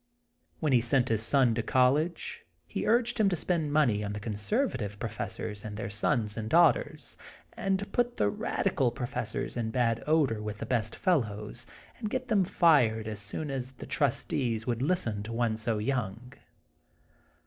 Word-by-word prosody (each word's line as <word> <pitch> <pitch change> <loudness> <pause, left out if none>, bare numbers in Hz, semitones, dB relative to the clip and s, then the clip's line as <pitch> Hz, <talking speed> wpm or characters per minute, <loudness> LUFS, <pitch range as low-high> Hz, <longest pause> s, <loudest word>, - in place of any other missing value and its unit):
When 150 -3 +1
he 120 - +5
sent 125 +1 +2
his 110 -2 +1
son 120 +1 +4
to 115 - 0
college 135 +8 +1 0.2
he - - -3
urged 240 +1 +2
him 210 -2 +5
to 180 - 0
spend 160 -2 0
money 125 -9 +3
on 105 0 -3
the 105 - -4
conservative 105 - -1
professors 105 -1 -4
and 105 -1 -6
their 110 - -4
sons 105 0 0
and 110 -1 -4
daughters, 175 - +3 0.4
and 195 -4 0
to 200 - -5
put 245 +3 -1
the 105 - +2
radical 120 +4 0
professors 125 +1 -4
in 115 -2 -2
bad 115 -1 0
odor 145 -9 +2
with 105 0 -5
the 110 - -5
best 110 -2 -1
fellows, 120 - -1
'* - - -24
and 215 -3 -3
get 255 +2 -3
them 205 -4 +4
fired 130 - +3
as 110 -1 -4
soon 120 +9 -3
as 130 -1 -4
the 125 - -10
trustees 115 -5 0
would 120 -1 -1
listen 135 - 0
to 110 +3 -6
one 115 -1 +1
so 110 0 -1
young. 115 0 -3
120 Hz, 175 wpm, -29 LUFS, 110-155 Hz, 0.4 s, he